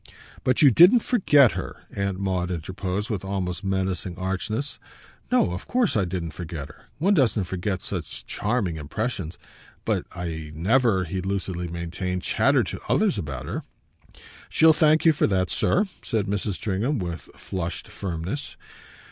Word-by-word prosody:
"But 130 +3 +3
you 140 - +8
didn't 180 - +7
forget 150 - +5
her!" - - -6
Aunt 100 -1 -1
Maud 95 -2 -1
interposed 95 +5 -3
with 100 -4 -2
almost 95 -1 -3
menacing 95 -2 -1
archness. 105 +8 -2 0.5
"No, - - +3
of 90 - -6
course 245 -5 +2
I 100 -3 +2
didn't 85 -2 -3
forget 80 -3 -6
her. - - -17
One 185 +8 +3
doesn't 125 - +3
forget 95 +1 -3
such - - -5
charming 105 -7 -1
impressions. 90 - -3 0.5
But - - 0
I 80 -3 -5
never," 105 +3 +3
he 90 +2 -3
lucidly 95 -2 -2
maintained, 85 +2 -3
"chattered - - +3
to - - -6
others - - +2
about 70 -4 -5
her." - - -3 0.9
"She'll 160 0 +6
thank 155 +1 +4
you 160 - +7
for 155 +1 +2
that, 95 -3 +1
sir," 200 - +2 0.2
said 110 -3 -1
Mrs. 100 0 -1
Stringham 110 +9 -1
with 85 -4 -5
a - - -24
flushed 85 -3 -4
firmness. 90 - -4
95 Hz, 155 wpm, -25 LUFS, 90-115 Hz, 0.9 s, you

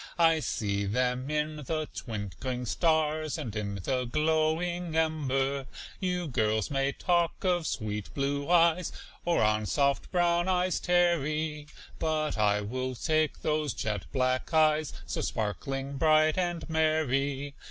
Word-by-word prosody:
I 165 -2 +5
see 100 -8 -1
them 125 +4 0
in 150 0 -1
the 155 +2 -3
twinkling 115 +3 -4
stars, 155 +2 +1
And 120 -9 -5
in 100 -1 -3
the 125 +7 -1
glowing 160 +4 0
ember. 140 -4 0 0.3
You 180 -2 -1
girls 110 -4 0
may 135 0 +1
talk 170 +3 0
of 175 -4 +1
sweet 105 -3 -3
blue 140 +1 -1
eyes, 170 0 +4 0.3
Or 170 -7 +2
on 105 0 +2
soft 140 +2 +1
brown 175 -1 +2
eyes 185 -1 +1
tarry, 155 -4 +1 0.3
But 155 -1 0
I 105 -1 +2
will 130 +4 -3
take 155 +3 0
those 150 -4 0
jet 105 -3 -2
black 130 +1 0
eyes, 155 -2 +3
So - - -3
sparkling, 135 +6 -3
bright, 155 0 +4
and 175 -2 -2
merry. 145 -3 0
150 Hz, 130 wpm, -29 LUFS, 130-160 Hz, 0.3 s, I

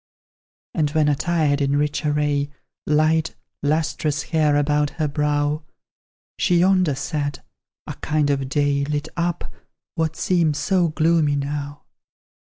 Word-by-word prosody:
And 155 -3 +1
when 155 0 +2
attired 150 -1 +1
in 140 0 +1
rich 150 +1 -1
array, 145 -1 0 0.4
Light, 155 +2 +2 0.3
lustrous 150 -1 0
hair 155 0 +2
about 145 0 +2
her 155 -2 +1
brow, 150 +1 0 0.8
She 175 - +3
yonder 180 -4 +3
sat, 145 0 -3 0.4
a - - -5
kind 150 -1 0
of 135 -1 -1
day 140 0 +1
Lit 150 +1 -2
up 175 0 -2 0.4
what 160 -1 -1
seems 165 -5 +1
so 185 -3 +2
gloomy 155 -2 +2
now. 145 0 -4
150 Hz, 125 wpm, -22 LUFS, 145-160 Hz, 0.8 s, She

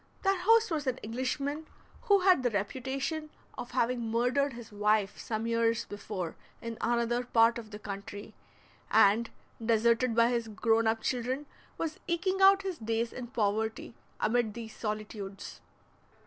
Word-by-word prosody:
Their 390 -1 +2
host 450 +2 +4
was 300 -3 -2
an 255 -1 0
Englishman, 275 +6 -3 0.4
who 400 -2 +5
had 365 -6 +5
the 250 - +2
reputation 265 +9 -3 0.3
of 245 - -6
having 240 -2 0
murdered 250 +4 +1
his 235 -2 -10
wife 210 -1 +1
some 220 0 -3
years 230 0 +1
before 200 -4 -5 0.2
in 230 -1 -6
another 240 +1 +1
part 230 -1 +4
of 220 -2 -10
the 210 - -7
country, 205 0 -7 0.6
and, 220 +2 +4 0.3
deserted 230 +1 +3
by 230 0 +5
his 235 -2 -1
grown 225 +1 +2
up 225 0 +1
children, 255 +3 -1 0.3
was 320 -2 -3
eking 370 +3 0
out 390 +1 +7
his 380 -3 -4
days 230 +1 -1
in 245 -1 -6
poverty 220 -1 -1 0.3
amid 225 -2 +1
these 225 -2 -8
solitudes. 210 -2 -6
235 Hz, 150 wpm, -30 LUFS, 220-265 Hz, 0.6 s, out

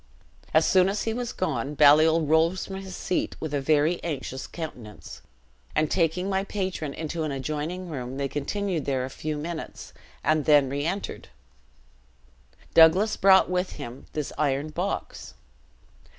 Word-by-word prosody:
"As 160 +1 +4
soon 185 0 +4
as 205 +1 -2
he 225 - -1
was 245 0 -3
gone, 145 -5 -2
Baliol 155 +2 +6
rose 160 +4 +2
from 190 - -6
his 190 -1 -8
seat 185 - -2
with 155 -2 -5
a 145 - 0
very 155 +4 +2
anxious 135 -5 -4
countenance, 125 -10 -8 0.5
and 155 0 +1
taking 180 +1 +1
my 195 0 0
patron 185 -7 -3
into 160 +1 -4
an 155 -2 -2
adjoining 155 +7 -4
room, 130 -4 -5
they 140 0 -1
continued 170 +4 -2
there 130 -2 -1
a 130 - -8
few 155 +2 -4
minutes, 160 +2 -6 0.3
and 155 0 +2
then 145 -3 +5
reentered. 155 +8 -3 1.5
Doublas 180 +7 +6
brought 190 0 +6
with 180 +1 -1
him 120 +3 -9
this 150 -2 -3
iron 145 0 0
box. 180 +6 -4
155 Hz, 150 wpm, -26 LUFS, 145-185 Hz, 1.5 s, Baliol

